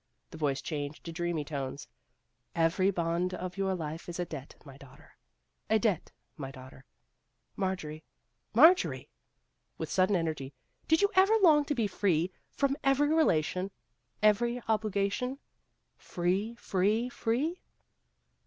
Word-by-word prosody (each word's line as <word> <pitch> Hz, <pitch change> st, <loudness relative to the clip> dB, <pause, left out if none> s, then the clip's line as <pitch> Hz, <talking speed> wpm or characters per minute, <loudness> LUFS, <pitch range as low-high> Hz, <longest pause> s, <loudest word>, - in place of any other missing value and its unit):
The -, -, -9 dB
voice 140 Hz, -3 st, 0 dB
changed 145 Hz, -2 st, -4 dB
to 170 Hz, -, -6 dB
dreamy 170 Hz, -2 st, -2 dB
tones. 140 Hz, -2 st, -5 dB, 0.2 s
" -, -, -48 dB
' -, -, -44 dB
Every 185 Hz, +3 st, +1 dB
bond 175 Hz, 0 st, -1 dB
of 180 Hz, 0 st, -5 dB
your 195 Hz, -1 st, 0 dB
life 160 Hz, 0 st, -6 dB
is 175 Hz, -, -6 dB
a 175 Hz, -, 0 dB
debt, 145 Hz, -4 st, -8 dB
my 135 Hz, -2 st, -11 dB
daughter 135 Hz, -1 st, -17 dB, 0.3 s
' -, -, -50 dB
a 220 Hz, -, +5 dB
debt, 205 Hz, -6 st, 0 dB, 0.3 s
my 135 Hz, -3 st, -5 dB
daughter. 130 Hz, 0 st, -13 dB, 0.7 s
Marjorie, 160 Hz, -5 st, -3 dB, 0.5 s
Marjorie! 325 Hz, -, +5 dB, 0.3 s
" -, -, -49 dB
with -, -, -5 dB
sudden 190 Hz, +2 st, +3 dB
energy, 155 Hz, -6 st, -2 dB
" -, -, -41 dB
did 320 Hz, +4 st, +4 dB
you 405 Hz, -, +3 dB
ever 385 Hz, +4 st, +5 dB
long 300 Hz, -4 st, +6 dB
to 290 Hz, -, -1 dB
be 230 Hz, -4 st, +1 dB
free 185 Hz, -3 st, +1 dB, 0.2 s
from 275 Hz, -1 st, 0 dB
every 275 Hz, +2 st, +3 dB
relation 185 Hz, -, +2 dB, 0.5 s
every 235 Hz, +3 st, +3 dB
obligation 215 Hz, +4 st, 0 dB, 0.6 s
free, 190 Hz, +6 st, -1 dB
free, 215 Hz, +2 st, +1 dB
free 255 Hz, +8 st, -1 dB
185 Hz, 145 wpm, -30 LUFS, 155-235 Hz, 0.7 s, long